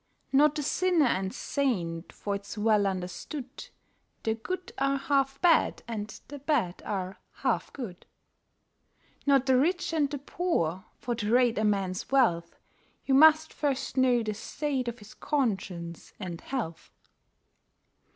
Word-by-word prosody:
Not 295 +2 +5
the 300 - -2
sinner 350 +1 +2
and 190 -5 0
saint, 180 - -2
for 200 - -4
it's 200 +1 -6
well 210 -1 +3
understood 195 - -5 0.5
The 220 - +1
good 360 +12 -5
are 275 0 +2
half 275 -1 +1
bad, 345 -2 +4
and 215 -2 -5
the 290 0 -8
bad 260 - 0
are 190 -1 -3 0.3
half - - +1
good. 215 -10 -8 1.2
Not 275 -2 +5
the 260 -1 +4
rich 345 +5 +1
and 300 -3 +2
the 285 - -3
poor, 240 - -1
for 240 - -3
to 220 -2 -2
rate 240 -2 +4
a - - +1
man's 195 -3 0
wealth 230 -12 +2 0.5
You 270 - +1
must 315 +2 +6
first 275 -2 -1
know 250 -3 +4
the 215 -1 -2
state 265 +4 -3
of 235 0 -3
his 210 -2 -13
conscience 190 - -2
and 175 -4 -6
health. 225 -12 -4
245 Hz, 140 wpm, -29 LUFS, 200-280 Hz, 1.2 s, must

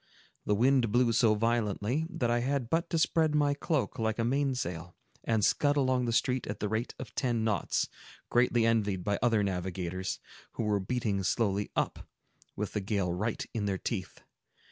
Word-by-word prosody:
The 105 - +3
wind 125 0 +3
blew 120 0 +3
so 110 -1 +4
violently, 115 +5 0
that 135 -10 -1
I 120 - +2
had 130 -1 -1
but 170 +1 +1
to 165 - 0
spread 160 -1 +2
my 145 -1 +3
cloak 145 -2 -1
like 110 -1 0
a 115 - 0
main 135 +2 +1
sail, 85 -6 -5 0.3
and 110 -3 +2
scud 145 0 +2
along 130 -2 +2
the 120 - 0
street 125 +2 +1
at 105 - -4
the 105 - -1
rate 110 +3 -2
of 130 - -8
ten 120 -4 0
knots, 105 -5 0 0.4
greatly 120 -1 +3
envied 105 -5 +1
by 100 +2 0
other 115 -3 +3
navigators, 95 -1 -3 0.4
who - - -3
were 105 -2 +1
beating 105 -1 -1
slowly 100 0 0
up, - - 0 0.6
with 105 0 -3
the 105 - -1
gale 95 -3 -1
right 105 +5 -2
in 110 -3 -2
their 95 -1 0
teeth. 95 -2 -4
115 Hz, 185 wpm, -30 LUFS, 100-125 Hz, 0.6 s, so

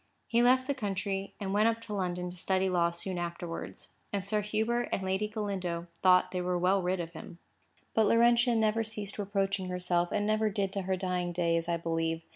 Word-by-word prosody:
He 235 0 +3
left 255 +1 +4
the 280 - 0
country, 200 -4 -3
and 195 -2 -3
went 210 +2 +4
up 230 0 +1
to 220 -2 -7
London 180 -2 -2
to - - -11
study 190 +1 +1
law 170 -2 +3
soon 175 +1 -5
afterwards; 170 -1 -5 0.2
and 200 -2 -2
Sir 210 +1 +1
Hubert 220 +4 0
and 190 - -1
Lady 190 +3 0
Galindo 195 -6 -3 0.2
thought 185 -1 +5
they 180 - -2
were 180 0 0
well 185 +2 +3
rid 180 +1 0
of 170 -1 -5
him. 170 +1 -10 0.6
But 220 -1 +4
Laurentia 235 +1 +4
never 220 0 +2
ceased 210 -2 -6
reproaching 195 -2 -1
herself, 180 -1 0
and 205 0 0
never 215 0 +2
did 195 -2 -1
to 200 - -1
her 190 - +2
dying 180 -1 -1
day, 170 -1 +1
as 165 +1 -1
I 170 - +1
believe. 165 0 -1
190 Hz, 210 wpm, -30 LUFS, 175-215 Hz, 0.6 s, thought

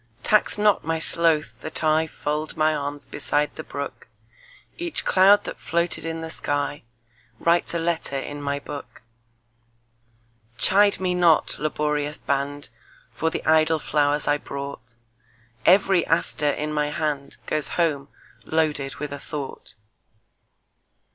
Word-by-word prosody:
Tax 210 0 +4
not 210 -1 +3
my 165 +1 -1
sloth 160 -1 +3
that 160 - -7
IFold 155 -1 0
my 155 0 +3
arms 145 -1 -3
beside 145 +1 -1
the - - -5
brook; - - -6 0.7
Each 345 -1 -2
cloud 195 +2 +6
that - - -7
floated 170 -1 -1
in 165 0 -4
the 165 - -5 1.1
skyWrites 170 0 +2
a - - +2
letter 165 -4 -1
in 145 +2 -5
my 140 0 -1
book. 145 -3 -9 1.5
Chide 200 +1 +4
me 185 -1 0
not, 175 -3 +3
laborious 150 0 -1
band, 140 0 -2 0.4
For 160 - 0
the - - -5
idle 160 0 +4
flowers 145 -1 0
I 145 - +3
brought; 140 -5 -7 0.7
Every 190 -1 +5
aster 160 -2 +1
in 150 +2 -2
my 150 -1 0
handGoes 150 0 -3
home 150 -5 +1 0.4
loaded 150 -4 -1
with 150 -1 -5
a 145 - -6
thought. 140 -7 -7
155 Hz, 125 wpm, -24 LUFS, 145-165 Hz, 1.5 s, cloud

